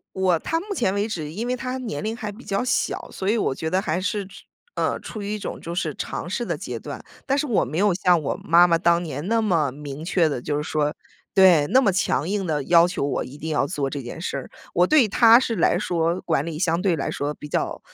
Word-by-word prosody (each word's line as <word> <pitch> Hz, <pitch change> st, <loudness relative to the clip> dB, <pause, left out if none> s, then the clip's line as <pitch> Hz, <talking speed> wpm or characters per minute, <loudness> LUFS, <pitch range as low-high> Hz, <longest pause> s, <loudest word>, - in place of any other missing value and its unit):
我 185 Hz, -3 st, +2 dB
他 325 Hz, -, -1 dB
目 400 Hz, +4 st, -5 dB
前 235 Hz, -, +1 dB
为 205 Hz, +1 st, 0 dB
止， 160 Hz, -8 st, -4 dB
因 220 Hz, +8 st, -4 dB
为 250 Hz, -, 0 dB
他 255 Hz, +1 st, -4 dB
年 220 Hz, -, -5 dB
龄 220 Hz, +1 st, -3 dB
还 210 Hz, -3 st, -5 dB
比 225 Hz, +5 st, -13 dB
较 195 Hz, +4 st, -1 dB
小， 255 Hz, -, -1 dB
所 190 Hz, -, -3 dB
以 220 Hz, -, +3 dB
我 170 Hz, -, 0 dB
觉 160 Hz, +3 st, -4 dB
得 185 Hz, +2 st, +2 dB
还 170 Hz, -1 st, -1 dB
是， 200 Hz, +1 st, -2 dB, 0.5 s
呃， -, -, 0 dB
处 215 Hz, -, -8 dB
于 205 Hz, +1 st, -3 dB
一 -, -, -4 dB
种 -, -, -6 dB
就 170 Hz, -, -6 dB
是 180 Hz, -, -2 dB
尝 -, -, -5 dB
试 -, -, -2 dB
的 -, -, -2 dB
阶 -, -, -5 dB
段， -, -, -7 dB, 0.3 s
但 275 Hz, +1 st, +1 dB
是 295 Hz, -, 0 dB
我 235 Hz, -7 st, +2 dB
没 150 Hz, +6 st, -4 dB
有 200 Hz, -1 st, +3 dB
像 180 Hz, -1 st, +3 dB
我 145 Hz, -, -2 dB
妈 170 Hz, +2 st, +6 dB
妈 170 Hz, -1 st, +3 dB
当 170 Hz, 0 st, +3 dB
年 150 Hz, 0 st, -5 dB
那 230 Hz, 0 st, +2 dB
么 170 Hz, -10 st, +1 dB
明 145 Hz, +2 st, -8 dB
确 170 Hz, -2 st, +2 dB
地 125 Hz, -4 st, -4 dB
就 145 Hz, -, -2 dB
是 150 Hz, -, -2 dB
说 150 Hz, -1 st, 0 dB, 0.4 s
对， 185 Hz, -6 st, +6 dB
那 255 Hz, +5 st, +5 dB
么 210 Hz, -7 st, +2 dB
强 165 Hz, -4 st, 0 dB
硬 200 Hz, -1 st, -1 dB
地 150 Hz, -4 st, -1 dB
要 170 Hz, +2 st, +5 dB
求 180 Hz, -, -2 dB
我 145 Hz, -, -1 dB
一 140 Hz, +3 st, -11 dB
定 160 Hz, -, -5 dB
要 145 Hz, -2 st, +1 dB
做 140 Hz, -1 st, -2 dB
这 140 Hz, 0 st, -5 dB
件 120 Hz, +6 st, -8 dB
事 175 Hz, -, -3 dB
儿， -, -, -7 dB, 0.2 s
我 175 Hz, -, +4 dB
对 290 Hz, -2 st, +5 dB
他 230 Hz, +2 st, +6 dB
是 245 Hz, -3 st, -1 dB
来 175 Hz, -, +2 dB
说， 170 Hz, +1 st, 0 dB
管 155 Hz, -4 st, 0 dB
理 160 Hz, -2 st, -5 dB
相 170 Hz, 0 st, +1 dB
对 185 Hz, -4 st, +2 dB
来 -, -, -2 dB
说 145 Hz, +1 st, -2 dB
比 150 Hz, -, -10 dB
较 -, -, -2 dB
175 Hz, 280 characters per minute, -23 LUFS, 155-210 Hz, 0.5 s, 妈